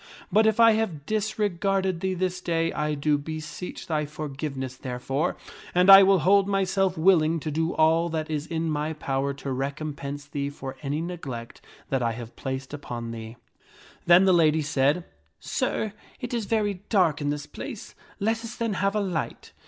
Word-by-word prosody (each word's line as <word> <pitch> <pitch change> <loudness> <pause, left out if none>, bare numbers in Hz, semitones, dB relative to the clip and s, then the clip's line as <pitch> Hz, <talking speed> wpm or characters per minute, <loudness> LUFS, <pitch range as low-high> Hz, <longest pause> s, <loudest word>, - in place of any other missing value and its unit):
But 220 +1 +5
if 220 +1 +2
I 230 -1 +8
have 190 -10 -1
disregarded 195 -3 0
thee 190 +1 -1
this 185 0 -2
day, 165 -2 0
I 150 0 -1
do 145 0 +1
beseech 155 +4 -6
thy 150 -2 -1
forgiveness 140 -3 -5
therefore, 130 +3 -2 0.4
and 180 +2 +7
I 195 0 +12
will 195 0 +5
hold 200 +1 +5
myself 195 -2 +1
willing 165 -2 +4
to 155 +1 -4
do 160 +3 -1
all 165 +2 +3
that 160 -1 -2
is 155 -1 -3
in 165 -1 -2
my 150 +1 -1
power 140 -2 -1
to 140 0 -5
recompense 140 +1 -4
thee 140 0 -3
for 135 -2 -7
any 145 +2 -2
neglect 140 -10 -6 0.3
that 135 -1 0
I 115 -1 0
have 115 0 -9
placed 135 +1 -5
upon 120 -5 -5
thee." 115 0 -7 0.7
Then 175 +2 +7
the 190 - +5
lady 160 -2 +4
said, 145 +3 +1 0.2
" 75 +3 -43
Sir, 210 - -2 0.3
it 245 -1 -5
is 230 -3 -1
very 205 -4 0
dark 175 -8 +3
in 145 - 0
this 145 0 -3
place; - - -8 0.3
let 225 +3 +1
us 230 - -7
then 230 -2 -1
have 200 +1 +1
a 210 - +2
light." 180 -5 -3
160 Hz, 180 wpm, -26 LUFS, 140-190 Hz, 0.7 s, I